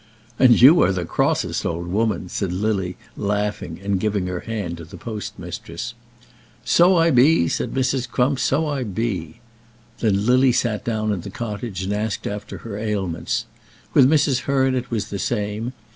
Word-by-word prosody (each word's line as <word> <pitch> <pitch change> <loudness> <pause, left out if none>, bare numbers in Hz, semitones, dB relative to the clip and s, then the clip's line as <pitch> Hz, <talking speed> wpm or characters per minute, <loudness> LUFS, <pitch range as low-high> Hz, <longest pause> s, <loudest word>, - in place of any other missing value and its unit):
"And 125 -3 +6
you 145 +8 +8
are 90 - +4
the 90 -2 -2
crossest - - 0
old 85 +1 -2
woman," 100 0 -1
said 95 0 -3
Lily, 95 -1 -1 0.2
laughing, 105 -5 -2
and 100 -1 0
giving 105 -2 0
her 90 -1 -3
hand 100 -7 -4
to 85 - -9
the 90 +3 -11
postmistress. 105 -1 -6 0.7
"So 180 +2 +5
I 165 0 +4
be," 130 - +5
said - - -2
Mrs. 130 -1 0
Crump. 130 +2 +1
"So 140 +4 +1
I 145 -3 -2
be." 100 -7 -3 0.6
Then 105 -2 +1
Lily 130 +1 +4
sat 110 -4 0
down 110 -2 -1
in 95 - -3
the 100 - -8
cottage 105 -2 -5
and 100 +2 -2
asked 105 +1 -2
after 105 0 -5
her 105 -3 -5
ailments. 100 -6 -2 0.5
With 130 -1 +6
Mrs. 145 -4 +3
Hearn 135 -1 +2
it 125 -1 -2
was 110 -4 -3
the 100 - -3
same. 105 +2 -2
105 Hz, 170 wpm, -22 LUFS, 95-125 Hz, 0.7 s, you